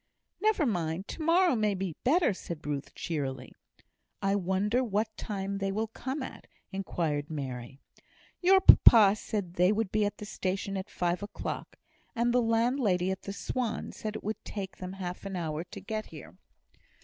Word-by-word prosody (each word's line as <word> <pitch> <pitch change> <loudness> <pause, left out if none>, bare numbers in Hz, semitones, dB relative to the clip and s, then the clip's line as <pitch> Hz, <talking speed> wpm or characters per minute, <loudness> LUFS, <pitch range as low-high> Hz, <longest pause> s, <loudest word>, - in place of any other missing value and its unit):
"Never 430 -7 +3
mind! 175 -4 -1
to - - -6
morrow 335 -1 +4
may 210 -3 +1
be 185 -4 -3
better," 305 - +4
said 170 -3 -7
Ruth, 145 -1 -4
cheerily. 135 -6 -4 0.7
"I 195 0 +1
wonder 200 +6 +1
what 215 -1 -1
time 195 -1 -3
they 195 0 -1
will 220 +2 -1
come 265 +5 -4
at?" - - -9 0.2
inquired 165 -6 -2
Mary. 130 -4 -5 0.6
"Your 380 +1 +6
papa 215 - +8
said 205 -4 -4
they 180 +2 +5
would 215 -2 0
be 215 0 +2
at 205 0 -1
the 210 - -7
station 195 0 -2
at 190 +1 -4
five 175 +1 -1
o'clock. 205 - -5 0.4
And 240 +1 +2
the 250 - +4
landlady 225 -5 +2
at 190 - -4
the 200 - -6
Swan 240 +2 -3
said 215 -1 -5
it - - -6
would 215 +2 -4
take 190 -4 -6
them 185 0 -6
half 180 -2 -5
an 195 -1 -5
hour 160 -2 -2
to - - -9
get 215 +3 -4
here." 140 - -11
195 Hz, 175 wpm, -30 LUFS, 175-225 Hz, 0.7 s, papa